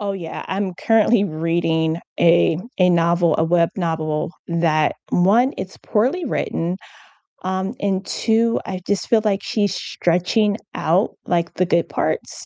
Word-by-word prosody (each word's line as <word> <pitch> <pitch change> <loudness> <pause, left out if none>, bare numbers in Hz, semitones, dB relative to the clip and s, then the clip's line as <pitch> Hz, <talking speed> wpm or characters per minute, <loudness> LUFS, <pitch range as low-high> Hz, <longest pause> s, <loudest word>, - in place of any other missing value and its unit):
Oh, 205 -1 -2
yeah, 170 -4 -6
I'm 190 -1 -2
currently 225 +1 +3
reading 165 -1 0 0.2
a 165 -1 +4 0.2
a 180 -1 +5
novel 170 -1 +2
a 160 - +3
web 170 0 +3
novel 160 -2 -2 0.2
that 165 -2 +1
1, 225 +9 +3
it's 190 0 -6
poorly 265 +12 0
written, 180 - -2 0.7
um, 190 +3 -2
and 195 -1 -1
2, 230 +1 +1
I 185 -1 -5
just 200 -3 -1
feel 225 -2 +3
like 200 -2 0
she's 205 -3 -1
stretching 200 +5 0 0.2
out, 180 +7 +1
like, 170 -1 -1
the 185 - +1
good 170 -1 +1
parts, - - -3
180 Hz, 145 wpm, -20 LUFS, 165-205 Hz, 0.7 s, a